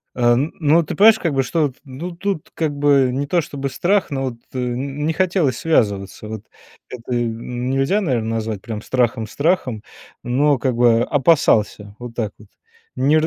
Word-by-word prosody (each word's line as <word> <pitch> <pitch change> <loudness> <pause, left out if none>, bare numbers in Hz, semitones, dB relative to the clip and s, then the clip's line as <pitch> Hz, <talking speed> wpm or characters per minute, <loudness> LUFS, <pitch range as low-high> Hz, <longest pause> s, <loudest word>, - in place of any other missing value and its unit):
А 120 -1 +3
н 140 +6 0
но 160 +1 +4
ты 155 - -6
понимаешь, 220 +2 +7
как 165 -4 -1
бы 135 - +2
что, 155 +3 +1
т 130 - -15
ну 140 +6 -7
тут, 180 -1 -4
как 160 -3 -1
бы, 140 -2 +3
не 140 +3 -2
то 175 +3 +2
чтобы 140 -3 -5
страх, 195 +8 +1
но 135 -2 -2
вот, 130 -2 -3 0.2
э, - - -3
н 135 +4 -3
не 160 - +1
хотелось 175 -5 +1
связываться. 105 -10 0
Вот. 110 -1 -7 0.4
Это 125 0 -6
нельзя 125 - -1
наверно 120 - -1
назвать 110 -2 -3
прям 110 +1 -6
страхом 120 -2 0
страхом, 140 - 0 0.4
но 140 +3 +2
как 130 0 0
бы 120 -1 +4
опасался. 115 -8 +2
Вот 120 -1 -8
так 110 -3 -2
вот. 105 - -17 0.5
Не 145 +4 +3
ра 155 - +1
135 Hz, 185 wpm, -20 LUFS, 120-155 Hz, 0.5 s, понимаешь